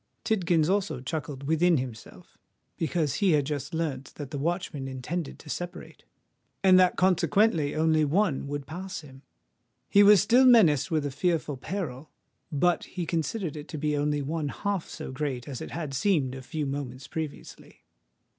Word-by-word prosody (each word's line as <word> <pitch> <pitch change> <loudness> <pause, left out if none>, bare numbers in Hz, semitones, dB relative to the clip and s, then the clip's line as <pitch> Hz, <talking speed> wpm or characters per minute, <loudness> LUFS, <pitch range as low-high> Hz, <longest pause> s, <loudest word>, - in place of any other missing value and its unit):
Tidkins 175 -8 +2
also 195 -6 0
chuckled 140 +1 -5
within 160 +3 +3
himself; 125 -4 -8 0.4
because 160 -3 -1
he 190 -4 +4
had 145 -2 +2
just 145 -1 -4
learnt 150 -5 -3
that 145 -3 -7
the 145 - -3
watchmen 165 -3 -2
intended 135 +5 -4
to - - -16
separate, 175 +4 -7 0.6
and 185 -1 +7
that 180 -1 +4
consequently 180 -3 +2
only 155 0 +3
one 155 -1 +1
would 145 -1 -4
pass 185 +5 -6
him. 135 -3 -14 0.7
He 200 - +5
was 205 -1 +8
still 240 +7 +5
menaced 190 - +6
with 155 -3 0
a 145 - -2
fearful 160 -1 0
peril; 155 -3 -5 0.4
but 175 +4 +1
he 180 -2 -5
considered 165 +1 -2
it 150 0 -8
to 155 - -6
be 150 0 0
only 145 0 0
one 155 +1 -2
half 200 +2 -3
so - - -7
great 130 -2 -3
as 135 -4 -6
it - - -6
had 155 -4 -5
seemed 140 -3 +1
a 130 - -7
few 150 +4 -4
moments 135 -2 -5
previously. 155 -3 -7
155 Hz, 165 wpm, -27 LUFS, 140-180 Hz, 0.7 s, was